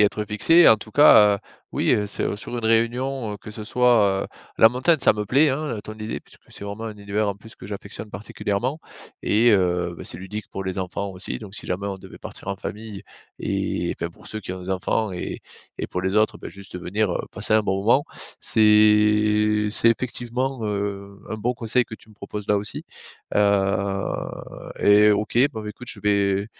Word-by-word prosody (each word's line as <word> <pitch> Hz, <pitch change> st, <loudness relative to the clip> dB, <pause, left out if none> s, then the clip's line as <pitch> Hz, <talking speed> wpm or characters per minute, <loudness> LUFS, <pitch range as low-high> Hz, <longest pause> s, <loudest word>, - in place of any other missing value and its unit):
être 105 Hz, +1 st, +1 dB
fixé 105 Hz, +9 st, +1 dB
et -, -, +9 dB
en 110 Hz, -, +7 dB
tout 110 Hz, 0 st, -12 dB
cas, 105 Hz, -8 st, +7 dB
heu, -, -, -12 dB, 0.3 s
oui, -, -, +1 dB
heu, 105 Hz, -1 st, 0 dB
c'est 100 Hz, -, -3 dB
sur 120 Hz, +3 st, -7 dB
une 115 Hz, -, -4 dB
réunion, 115 Hz, +1 st, +1 dB
heu, -, -, -5 dB
que 105 Hz, -, -11 dB
ce 105 Hz, 0 st, -8 dB
soit, 110 Hz, -5 st, +3 dB
heu, -, -, -5 dB, 0.3 s
la 110 Hz, -, +8 dB
montagne, 130 Hz, +8 st, +2 dB
ça -, -, +5 dB
me 105 Hz, 0 st, -3 dB
plaît, 135 Hz, +9 st, +4 dB
hein, 135 Hz, -4 st, -3 dB
ton 110 Hz, -, -8 dB
idée 110 Hz, 0 st, -5 dB
puisque -, -, -21 dB
c'est -, -, -11 dB
vraiment 100 Hz, +2 st, -6 dB
un 110 Hz, -, -4 dB
univers 100 Hz, +1 st, -2 dB
en 100 Hz, -, -1 dB
plus 110 Hz, +3 st, -15 dB
que -, -, -11 dB
j'affectionne 100 Hz, +1 st, -7 dB
particulièrement 105 Hz, +7 st, -3 dB, 0.4 s
et 115 Hz, +3 st, +4 dB
heu, 90 Hz, -3 st, +1 dB
bah, -, -, -8 dB
c'est -, -, -6 dB
ludique 100 Hz, +2 st, -7 dB
pour 95 Hz, -, -4 dB
les 95 Hz, 0 st, -4 dB
enfants 95 Hz, +2 st, -3 dB
aussi 95 Hz, 0 st, -6 dB
donc 105 Hz, -3 st, -10 dB
si -, -, -6 dB
jamais 100 Hz, +3 st, -2 dB
on 100 Hz, -, -4 dB
devait -, -, -13 dB
partir -, -, -9 dB
en 100 Hz, -, -1 dB
famille 105 Hz, -1 st, -7 dB, 0.4 s
et -, -, -1 dB
enfin, 85 Hz, -, -1 dB
pour 85 Hz, -, -15 dB
ceux 110 Hz, -, -5 dB
qui 95 Hz, -, -6 dB
ont 95 Hz, 0 st, -7 dB
des 90 Hz, -, -6 dB
enfants 95 Hz, +3 st, 0 dB
et 90 Hz, -, -5 dB, 0.4 s
et -, -, -3 dB
pour 90 Hz, -, -3 dB
les 95 Hz, +1 st, -1 dB
autres, 110 Hz, 0 st, +2 dB
bah, -, -, -8 dB
juste 100 Hz, -2 st, -10 dB
venir, 100 Hz, +3 st, -1 dB
heu, -, -, -1 dB
passer -, -, +1 dB
un 110 Hz, -, +6 dB
bon 95 Hz, -1 st, 0 dB
moment. 125 Hz, +7 st, +4 dB, 0.3 s
C'est 105 Hz, 0 st, +4 dB
c'est 115 Hz, -, +4 dB
effectivement, 125 Hz, +1 st, -2 dB
heu, 100 Hz, -1 st, -4 dB
un -, -, -3 dB
bon 120 Hz, +4 st, -1 dB
conseil 120 Hz, +1 st, +1 dB
que 110 Hz, -, -9 dB
tu -, -, -22 dB
me 110 Hz, -, -17 dB
proposes 105 Hz, 0 st, -7 dB
là, 105 Hz, -, +3 dB
aussi, 100 Hz, +1 st, -4 dB, 0.5 s
heu 100 Hz, -1 st, +3 dB, 1.0 s
et 105 Hz, +1 st, +6 dB
OK. 105 Hz, +2 st, 0 dB
Bon, 110 Hz, -, -6 dB
ben, 105 Hz, -, -6 dB
écoute, 125 Hz, +3 st, -12 dB
je -, -, -8 dB
vais 100 Hz, -1 st, +1 dB
105 Hz, 215 wpm, -23 LUFS, 100-110 Hz, 1.0 s, et